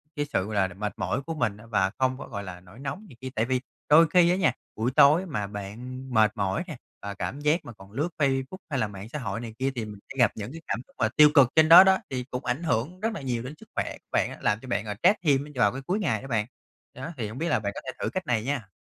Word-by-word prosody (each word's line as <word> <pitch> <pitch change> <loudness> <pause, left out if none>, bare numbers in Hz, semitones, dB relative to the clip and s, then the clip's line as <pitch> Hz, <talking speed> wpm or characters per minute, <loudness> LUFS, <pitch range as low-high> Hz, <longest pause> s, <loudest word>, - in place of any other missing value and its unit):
cái 145 - -1
sự, 95 -10 -1
gọi 105 +1 -5
là, - - -10
mệt 105 +3 -4
mỏi 135 - -1
của 165 +3 -5
mình 115 -9 -1
á 105 - -14
và 95 -4 +1
không 130 0 +1
có, - - -8
gọi 100 -4 -5
là, 90 -2 -8
nổi 90 +6 -16
nóng 140 +10 -5
này 130 - -14
kia. 130 - -5
Tại 110 - +1
vì 130 0 0 0.3
đôi 160 +3 +7
khi 170 +1 +5
á 180 - +3
nha, 185 -8 +3 0.2
buổi 115 +3 0
tối 150 +7 +6
mà 125 - -3
bạn 115 +6 -7
mệt 110 -2 +5
mỏi 100 - 0
nè 155 - -7 0.2
và 100 - -5
cảm 135 +7 -4
giác 150 +4 +1
mà 120 - -8
còn 95 -2 -16
lướt 145 +10 -1
Facebook 135 +3 0
hay 140 -4 -1
là 110 - +1
mạng 100 +1 -9
xã 150 - -5
hội 110 -4 -3
này 115 -2 -7
kia 135 +1 +1
thì 115 -3 -3
m 105 - -8 0.2
sẽ - - -9
gặp 120 -4 +5
những 105 +2 -6
cái 165 +2 -9
cảm - - -1
xúc - - -27
mà 110 - +2
tiêu 150 0 +9
cực 140 -5 +7
trên 155 0 +6
đó 170 +3 +12
đó, 190 0 +5
thì 130 -2 -3
cũng 125 - -4
ảnh 125 +7 -1
hưởng 160 +4 -1
rất 225 +2 -1
là 200 - -6
nhiều 120 -3 -2
đến 130 +3 -6
sức - - -16
khỏe - - -2
bạn - - +2
á, - - -9
làm 105 +1 +1
cho 130 - -11
bạn, 105 -4 -1
à, 105 -1 -4
stress 190 +4 +6
thêm 140 -3 +3
á 150 - -11
vào 105 -5 +3
cái 135 - -6
cuối 190 +4 0
ngày 115 - 0
đó - - -9
bạn, 110 -5 0 0.5
đó, 135 +6 -6
thì 115 -4 -2
hông 110 - -8
biết 165 - -1
là - - +2
bạn 100 -2 -3
có - - -6
thể 130 - -3
thử - - -1
cách 185 -1 -4
này 115 -3 +1
nha! 130 -5 -2
130 Hz, 305 wpm, -27 LUFS, 110-150 Hz, 0.5 s, đó